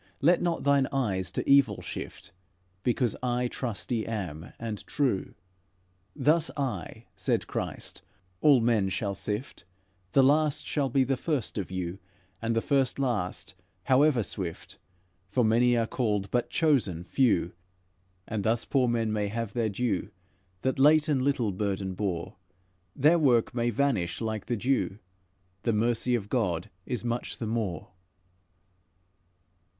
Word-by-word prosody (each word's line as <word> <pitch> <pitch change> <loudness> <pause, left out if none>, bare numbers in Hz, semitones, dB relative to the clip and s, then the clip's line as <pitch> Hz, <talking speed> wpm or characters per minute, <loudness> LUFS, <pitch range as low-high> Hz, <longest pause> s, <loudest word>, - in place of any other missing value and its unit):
Let 170 +5 +4
not 170 -1 -1
thine 140 -1 +3
eyes 100 -9 -1
to - - -3
evil 140 -7 +5
shift, - - -7 0.5
Because 120 +1 +1
I 125 0 0
trusty 120 -2 -3
am, 90 -8 -5
and 110 -3 -5
true.' 130 -10 -1 0.8
'Thus 160 +2 +3
I,' 120 - -4
said - - 0
Christ, - - -4 0.4
'all 140 -5 +6
men 115 -4 +2
shall 100 +1 -2
sift. 105 +5 -4 0.5
The 135 - +6
last 150 +2 +3
shall 140 -3 0
be 135 +2 +3
the 130 0 0
first 135 -6 -2
of 95 - -4
you; 90 0 -4 0.4
And 115 0 0
the 115 - +1
first 135 -3 +2
last, 100 -7 0 0.3
however 135 -2 +4
swift, 90 -4 -6 0.5
For 120 +4 +2
many 120 +2 +4
are 115 - +2
called, 105 -5 -1
but 120 -1 0
chosen, 125 - +1
few.' 100 -5 +2 0.8
And 110 -3 -2
thus 115 +2 +1
poor 130 -3 +2
men 115 -2 0
may 105 -1 0
have 110 0 -4
their 115 -3 0
due, 115 +1 -1 0.5
That 130 0 -1
late 150 +2 +5
and 140 -3 +2
little 130 -6 +1
burden 95 -1 -2
bore; 95 -1 -3 0.6
Their 155 +5 +4
work 125 -7 +3
may 120 -1 +1
vanish 115 -8 0
like 110 -2 -3
the 120 - -1
dew, 125 -3 0 0.6
The 115 - 0
mercy 120 +3 +2
of 105 -4 -3
God 95 -8 -1 0.2
is 125 -1 -3
much 120 0 -2
the 115 - -4
more." 110 -7 -2
115 Hz, 145 wpm, -28 LUFS, 100-135 Hz, 0.8 s, all